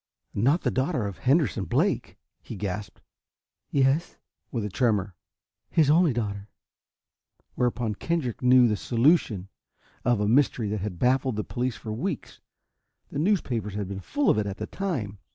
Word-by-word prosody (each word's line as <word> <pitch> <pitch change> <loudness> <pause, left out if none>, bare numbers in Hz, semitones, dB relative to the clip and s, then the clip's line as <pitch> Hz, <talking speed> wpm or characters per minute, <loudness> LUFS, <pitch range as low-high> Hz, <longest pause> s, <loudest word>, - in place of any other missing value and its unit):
"Not 140 - +2
the - - 0
daughter 130 -2 0
of 100 -3 -5
Henderson 130 - +2
Blake?" - - 0 0.2
he - - -8
gasped. 100 0 -5 0.7
"Yes," 140 +4 +1 0.3
with 115 -4 -2
a - - -3
tremor, 100 -3 +1 0.6
"his 150 -3 +4
only 165 0 +5
daughter." 105 -4 -3 1.0
Whereupon 120 -3 0
Kendrick 145 0 -2
knew 125 -1 +6
the 105 -2 0
solution 115 - +2 0.6
of 120 -3 +2
a 105 - +1
mystery 120 -2 +2
that 105 -1 -2
had 100 -3 -4
baffled 130 +2 +2
the 105 - -2
police 125 +1 -2
for 110 - -6
weeks. 160 - -4 0.7
The - - -3
newspapers 125 - 0
had 100 -2 -3
been 95 0 -5
full 290 - +1
of - - +2
it 105 - -1
at 100 - -5
the 110 - -4
time. 115 - -3
120 Hz, 155 wpm, -26 LUFS, 105-140 Hz, 1.0 s, knew